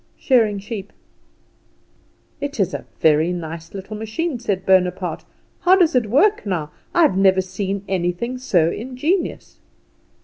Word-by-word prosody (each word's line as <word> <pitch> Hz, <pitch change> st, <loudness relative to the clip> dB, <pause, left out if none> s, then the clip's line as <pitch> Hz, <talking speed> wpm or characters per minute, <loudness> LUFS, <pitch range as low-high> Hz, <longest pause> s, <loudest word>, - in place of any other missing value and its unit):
"Shearing 225 Hz, -6 st, +2 dB
sheep." 205 Hz, 0 st, -7 dB, 1.5 s
"It 285 Hz, -3 st, -5 dB
is 195 Hz, -, +1 dB
a -, -, -5 dB
very 160 Hz, +2 st, +3 dB
nice 165 Hz, 0 st, -6 dB
little 195 Hz, +2 st, -7 dB
machine," 235 Hz, +7 st, -3 dB
said 200 Hz, -5 st, -2 dB
Bonaparte. 180 Hz, -2 st, +1 dB, 0.3 s
"How 365 Hz, +1 st, +5 dB
does 355 Hz, -4 st, +3 dB
it 245 Hz, -4 st, +2 dB
work, 400 Hz, -, +3 dB
now? 170 Hz, -7 st, -3 dB, 0.2 s
I 345 Hz, -, +4 dB
have 295 Hz, -, +3 dB
never 190 Hz, -1 st, +4 dB
seen 195 Hz, +1 st, -4 dB
anything 190 Hz, +7 st, -2 dB
so 175 Hz, -10 st, +2 dB
ingenious!" 265 Hz, -, -3 dB
200 Hz, 135 wpm, -21 LUFS, 180-255 Hz, 1.5 s, How